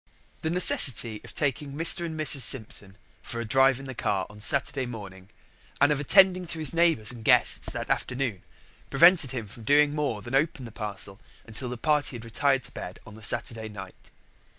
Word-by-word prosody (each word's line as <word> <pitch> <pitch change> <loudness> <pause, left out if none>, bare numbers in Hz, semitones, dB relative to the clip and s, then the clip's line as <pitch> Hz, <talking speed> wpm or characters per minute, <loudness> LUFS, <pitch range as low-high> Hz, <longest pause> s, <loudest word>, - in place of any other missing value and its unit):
The 160 - -3
necessity 130 -10 +5
of 120 - -13
taking 145 -1 -3
Mr. 165 +3 +2
and 160 -1 -7
Mrs. 150 -2 +2
Simpson 105 -6 0 0.2
for 115 - -7
a 115 - -4
drive 135 +3 +2
in 135 - -10
the 130 - -7
car 100 -5 -2
on 105 - -15
Saturday 135 +3 -1
morning 95 -5 -11 0.5
and 145 +1 +3
of 145 - 0
attending 185 +4 +4
to 165 - -3
his 155 -2 +1
neighbours 165 -10 +1
and 120 -3 -11
guests - - +2
that - - -5
afternoon 125 -7 -3 0.5
prevented 160 0 +4
him 120 -4 -6
from 110 +3 -13
doing 145 +4 +3
more 140 -9 -3
than 120 - -9
open 135 -2 -1
the 115 - -10
parcel 100 -2 -6 0.2
until 115 +3 -5
the 125 - -6
party 150 +1 0
had 115 -1 -9
retired 135 +3 0
to 125 - -10
bed 90 - -9
on 110 - -13
the 110 - -14
Saturday 110 +1 -1
night. 95 -3 -12
130 Hz, 195 wpm, -25 LUFS, 110-145 Hz, 0.5 s, necessity